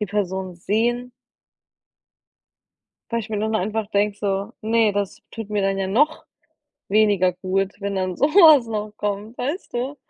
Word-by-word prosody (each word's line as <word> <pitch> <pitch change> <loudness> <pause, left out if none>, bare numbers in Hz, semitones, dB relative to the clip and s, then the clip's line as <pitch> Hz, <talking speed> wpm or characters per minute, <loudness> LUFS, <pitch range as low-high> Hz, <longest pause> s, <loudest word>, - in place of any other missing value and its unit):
die 210 - -1
Person 190 -2 -3
sehen 235 +7 -1 2.0
Weil 230 - 0
ich 220 0 -9
mir 210 - -1
nur 215 +1 -1
dann 220 -2 +1
einfach 215 +2 -2
denke 205 0 0
so: 195 -1 -2
„Ne, 220 -1 +2
das 200 -1 -3
tut 225 -3 -7
mir 210 -1 0
dann 195 0 0
ja 195 - -1
noch 290 +11 +1 0.6
weniger 200 -3 +3
gut, 190 +2 -1
wenn 200 -1 -3
dann 185 -1 -2
so 285 - +3
was 310 -6 +7
noch 215 -1 -4
kommt“, 210 +3 -4
weißt 295 +9 -4
du? 260 +4 -3
210 Hz, 165 wpm, -22 LUFS, 195-230 Hz, 2.0 s, was